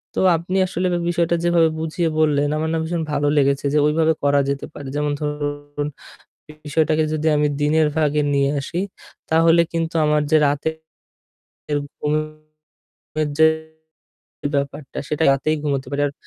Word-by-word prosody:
তো -, -, 0 dB, 0.2 s
আপনি 180 Hz, +3 st, -3 dB
আসলে 185 Hz, +1 st, -1 dB
বে -, -, +1 dB
বিষয়টা 170 Hz, 0 st, +1 dB
যেভাবে 170 Hz, -1 st, +4 dB
বুঝিয়ে 160 Hz, +1 st, -1 dB
বললেন 145 Hz, -2 st, +2 dB
আমার 160 Hz, +1 st, -1 dB
না -, -, +1 dB
ভীষণ 165 Hz, +1 st, -2 dB
ভালো 145 Hz, 0 st, +1 dB
লেগেছে 140 Hz, 0 st, +2 dB
যে 150 Hz, -, +4 dB
ওইভাবে 160 Hz, +1 st, +2 dB
করা 145 Hz, 0 st, +3 dB
যেতে 140 Hz, 0 st, -2 dB
পারে। 140 Hz, -, -8 dB
যেমন 150 Hz, 0 st, 0 dB
ধরুন 145 Hz, 0 st, -3 dB, 0.8 s
বিষয়টাকে 155 Hz, +1 st, +1 dB
যদি 155 Hz, 0 st, -1 dB
আমি 150 Hz, 0 st, +2 dB
দিনের 155 Hz, +1 st, +3 dB
ভাগে 150 Hz, -1 st, +2 dB
নিয়ে 140 Hz, 0 st, +2 dB
আসি 165 Hz, +5 st, -4 dB, 0.5 s
তাহলে 165 Hz, +1 st, +5 dB
কিন্তু 165 Hz, 0 st, -2 dB
আমার 150 Hz, 0 st, +2 dB
যে 155 Hz, -, +6 dB
রাতের 160 Hz, +3 st, -4 dB, 1.0 s
ঘুমের 155 Hz, 0 st, -5 dB, 0.6 s
যে 160 Hz, 0 st, +7 dB, 1.1 s
ব্যাপারটা 140 Hz, 0 st, -4 dB
সেটা 150 Hz, +1 st, 0 dB
রাতেই 145 Hz, +3 st, +1 dB
ঘুমোতে 140 Hz, -3 st, -1 dB
পারি। 145 Hz, 0 st, -1 dB
আর -, -, -6 dB
155 Hz, 150 wpm, -21 LUFS, 145-160 Hz, 1.1 s, যে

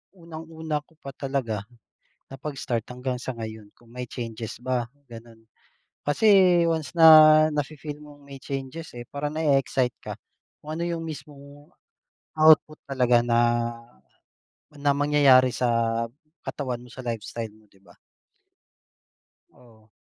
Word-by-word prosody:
unang-una 160 Hz, -2 st, -6 dB
ko 160 Hz, -, -27 dB
pa 135 Hz, -, -7 dB
talaga 130 Hz, -7 st, -3 dB, 0.6 s
na 135 Hz, -, -10 dB
pag-start 135 Hz, -5 st, -4 dB
hanggang 125 Hz, +1 st, -3 dB
sa -, -, -3 dB
ngayon 110 Hz, -2 st, -8 dB
kung 120 Hz, -, -25 dB
may 125 Hz, +2 st, -7 dB
changes 115 Hz, -2 st, -7 dB
ba, 125 Hz, -1 st, -1 dB, 0.2 s
gano'n. 115 Hz, -1 st, -14 dB, 0.6 s
Kasi 185 Hz, +2 st, +5 dB
once 160 Hz, -5 st, -2 dB
na 155 Hz, -1 st, +8 dB
nafi-feel 150 Hz, 0 st, -4 dB
mong 145 Hz, -1 st, -15 dB
may 140 Hz, -, -9 dB
changes, 135 Hz, +4 st, -7 dB
eh, 120 Hz, 0 st, -9 dB
parang 145 Hz, +1 st, -4 dB
nae-excite 135 Hz, -5 st, +1 dB
ka -, -, -5 dB, 0.5 s
kung 155 Hz, +1 st, -6 dB
ano 170 Hz, -, -2 dB
yung 170 Hz, -1 st, -3 dB
mismong 145 Hz, 0 st, -11 dB, 0.7 s
output 155 Hz, 0 st, +5 dB
talaga 125 Hz, -3 st, +2 dB
na 120 Hz, 0 st, +2 dB, 1.0 s
na 145 Hz, 0 st, 0 dB
mangyayari 140 Hz, -3 st, +4 dB
sa 115 Hz, -2 st, 0 dB, 0.4 s
katawan 125 Hz, -4 st, -5 dB
mo, 125 Hz, -, -15 dB
sa 130 Hz, +2 st, -10 dB
lifestyle 115 Hz, -1 st, -5 dB
mo, 110 Hz, -1 st, -24 dB
'di 95 Hz, -, -25 dB
ba? -, -, -19 dB, 1.6 s
Oo. 110 Hz, -, -22 dB
135 Hz, 130 wpm, -25 LUFS, 120-155 Hz, 1.6 s, na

